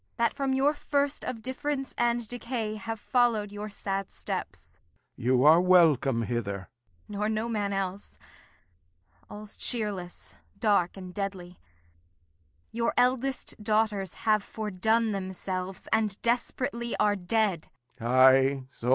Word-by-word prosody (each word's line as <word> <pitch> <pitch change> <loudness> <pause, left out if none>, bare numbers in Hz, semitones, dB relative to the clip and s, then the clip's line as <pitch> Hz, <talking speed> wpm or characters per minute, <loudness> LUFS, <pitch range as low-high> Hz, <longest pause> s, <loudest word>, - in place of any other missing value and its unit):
That 235 -1 +2
from 275 -1 -1
your 275 +3 +3
first 285 -1 -1
of 225 -3 -5
difference 270 +1 -3
and 240 -1 +1
decay 235 -2 -3
Have 225 0 -5
followed 230 -4 +1
your 205 +1 -6
sad 195 -1 -4
steps. 80 +3 -5 0.4
Lear. 120 - -9
You're 155 +6 +7
welcome 155 -9 +4
hither. 115 -4 -2
Kent. 95 - -13 0.5
Nor 210 +1 +1
no 220 +1 -1
man 210 -3 -1
else! 195 0 -4 1.1
All's 210 0 -9
cheerless, 205 -7 -2 0.3
dark, 200 -4 +2
and 185 -1 -8
deadly. 190 -3 -5 1.1
Your 230 0 -1
eldest 255 -2 0
daughters 210 -3 0
have 215 -2 +3
fordone 220 +2 0
themselves, 190 -1 -4
And 215 -3 +1
desperately 235 0 -1
are 210 -1 +3
dead. 195 -2 0
210 Hz, 115 wpm, -28 LUFS, 185-235 Hz, 1.1 s, You're